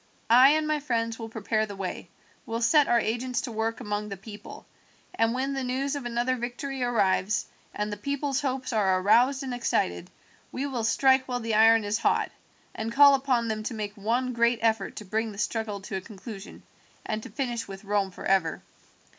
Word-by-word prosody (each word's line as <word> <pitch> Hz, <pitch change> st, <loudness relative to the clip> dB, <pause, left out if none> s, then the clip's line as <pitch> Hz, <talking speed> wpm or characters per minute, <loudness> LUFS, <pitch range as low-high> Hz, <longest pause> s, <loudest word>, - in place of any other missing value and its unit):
I 255 Hz, +3 st, +8 dB
and 310 Hz, 0 st, +1 dB
my 305 Hz, -1 st, +1 dB
friends 230 Hz, -5 st, -2 dB
will 225 Hz, -1 st, -6 dB
prepare 220 Hz, 0 st, -1 dB
the 200 Hz, -, -7 dB
way, 190 Hz, -2 st, -5 dB, 0.4 s
will 230 Hz, 0 st, -2 dB
set 295 Hz, +4 st, +5 dB
our 240 Hz, -, +4 dB
agents 240 Hz, +2 st, -1 dB
to 255 Hz, -, -5 dB
work 225 Hz, +1 st, -2 dB
among 210 Hz, 0 st, -3 dB
the 200 Hz, -, -6 dB
people, 205 Hz, +2 st, -11 dB, 0.5 s
and 225 Hz, 0 st, +2 dB
when 265 Hz, +3 st, -1 dB
the 270 Hz, -1 st, -2 dB
news 270 Hz, +3 st, -1 dB
of 280 Hz, -3 st, -5 dB
another 240 Hz, +2 st, 0 dB
victory 250 Hz, +3 st, -5 dB
arrives 215 Hz, -4 st, +1 dB, 0.3 s
and 210 Hz, 0 st, -3 dB
the -, -, -5 dB
people's 280 Hz, -1 st, -2 dB
hopes 265 Hz, -2 st, -2 dB
are 190 Hz, -4 st, +2 dB
aroused 245 Hz, +8 st, +3 dB
and 260 Hz, -2 st, -4 dB
excited, 90 Hz, -, -1 dB, 0.4 s
we 265 Hz, -, -3 dB
will 255 Hz, -5 st, -3 dB
strike 260 Hz, +3 st, +3 dB
while 250 Hz, -1 st, -2 dB
the 225 Hz, -1 st, -3 dB
iron 225 Hz, +1 st, +6 dB
is 205 Hz, +1 st, -1 dB
hot, -, -, +1 dB, 0.4 s
and 220 Hz, +1 st, -4 dB
call 280 Hz, +3 st, +7 dB
upon 260 Hz, -4 st, +1 dB
them 215 Hz, -1 st, -2 dB
to 225 Hz, +2 st, -4 dB
make 210 Hz, -1 st, -4 dB
one 240 Hz, +5 st, -1 dB
great 235 Hz, 0 st, +3 dB
effort 225 Hz, -1 st, +1 dB
to 210 Hz, -, -7 dB
bring 220 Hz, +3 st, -1 dB
the 200 Hz, -, -11 dB
struggle 210 Hz, -1 st, -2 dB
to 195 Hz, -, -6 dB
a -, -, -5 dB
conclusion 200 Hz, 0 st, -10 dB, 0.4 s
and 215 Hz, 0 st, -2 dB
to -, -, -9 dB
finish 240 Hz, -4 st, -3 dB
with 195 Hz, +1 st, -9 dB
Rome 200 Hz, -1 st, 0 dB
forever. 185 Hz, -2 st, 0 dB
230 Hz, 195 wpm, -27 LUFS, 210-255 Hz, 0.5 s, I